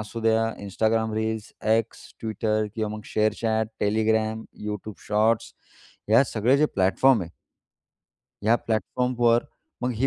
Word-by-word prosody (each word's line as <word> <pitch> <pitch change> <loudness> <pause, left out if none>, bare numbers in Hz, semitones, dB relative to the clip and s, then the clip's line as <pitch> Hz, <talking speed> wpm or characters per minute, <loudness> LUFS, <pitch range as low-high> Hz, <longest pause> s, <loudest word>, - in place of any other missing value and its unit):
असू 110 +2 -6
द्या, 115 0 +3 0.2
Instagram 110 +2 0
reels, 110 -1 -3 0.3
X, 115 0 -6 0.2
Twitter 110 0 0
किंवा 110 -2 -2
मग - - -8
share 110 0 +3
chat, 110 -1 0
Telegram, 110 +1 +1 0.2
YouTube 105 0 -5
shorts 110 +2 +2 0.6
ह्या 115 +4 +6
सगळे 120 +4 +2
जे 150 - +4
प्लॅटफॉर्म 105 +5 +3
आहे 85 - -8 1.1
ह्या 115 +3 +4
प्लॅटफॉर्मवर 120 +2 +1 0.4
मग 125 - +1
ही 125 +5 +1
110 Hz, 130 wpm, -25 LUFS, 110-115 Hz, 1.1 s, ह्या